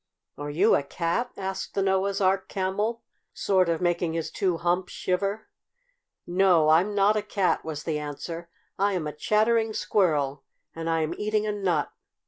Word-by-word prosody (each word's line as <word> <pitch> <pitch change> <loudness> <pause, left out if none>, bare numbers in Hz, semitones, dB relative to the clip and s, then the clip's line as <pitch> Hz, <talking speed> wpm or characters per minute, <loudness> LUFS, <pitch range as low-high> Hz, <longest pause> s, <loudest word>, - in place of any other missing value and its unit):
"Are 145 0 -6
you 185 +9 +3
a - - +2
cat?" 170 - -2
asked 190 0 -4
the 195 - +1
Noah's 195 +1 +1
Ark 190 0 +1
Camel, 205 +4 -2 0.3
sort 185 -3 +2
of 165 0 0
making 175 -1 +1
his 165 -1 -3
two 185 -4 0
humps 175 +2 0
shiver. 195 +4 -2 0.8
"No, 175 -3 +4
I'm 180 +6 +4
not 205 +1 +4
a 215 - +1
cat," 200 -3 0
was 150 -2 -5
the 155 -2 -2
answer. 165 +3 -6 0.3
"I 200 +1 +2
am 175 -4 -2
a 150 - -4
Chattering 220 +6 +2
Squirrel, 145 -11 +1 0.3
and 165 0 -3
I 165 0 +1
am 155 - -1
eating 215 0 0
a 210 - 0
nut. 185 -7 0
185 Hz, 170 wpm, -26 LUFS, 165-200 Hz, 0.8 s, No